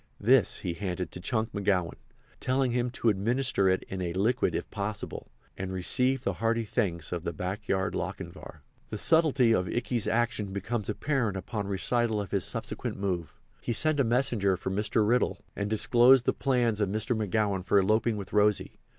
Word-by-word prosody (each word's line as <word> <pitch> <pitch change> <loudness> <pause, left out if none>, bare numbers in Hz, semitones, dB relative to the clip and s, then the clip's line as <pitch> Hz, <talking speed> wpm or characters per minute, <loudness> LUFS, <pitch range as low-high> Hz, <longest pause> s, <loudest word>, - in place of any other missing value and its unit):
This 120 +4 +4
he 90 -3 -3
handed 90 -1 -4
to - - -7
Chunk 110 +2 -1
McGowan, 95 -4 0 0.5
telling 130 0 +1
him 125 0 0
to 120 -1 0
administer 110 0 +1
it 95 - +1
in 95 -1 -6
a 85 -2 -2
liquid 110 +7 +1
if - - -3
possible, 105 0 -5 0.3
and 95 0 -5
received 125 +8 +1
the 100 - 0
hearty 115 0 +1
thanks 90 -8 -2
of 85 -2 -3
the 85 - -2
backyard 95 +2 -2
Lochinvar. - - -6 0.3
The 105 - -4
subtlety 140 -4 +4
of 90 -4 +1
Ikey's 120 0 -1
action 115 -4 0
becomes 105 +2 -3
apparent 115 -3 -1
upon 100 +1 -4
recital 110 +3 0
of 100 -3 -5
his 100 -2 +1
subsequent 115 +2 -3
move. 90 -4 -3 0.3
He 120 - -2
sent 155 +4 +1
a - - +5
messenger 115 -6 +1
for 95 - -4
Mr. 105 +2 +1
Riddle 125 +3 +2 0.2
and 100 0 -2
disclosed 120 +3 +5
the - - +2
plans 120 -5 +1
of 100 - +1
Mr. 110 +4 -1
McGowan 105 -2 0
for 100 +2 +2
eloping 110 +3 +2
with 100 -2 -8
Rosy. 105 -1 +2
105 Hz, 175 wpm, -28 LUFS, 95-120 Hz, 0.5 s, a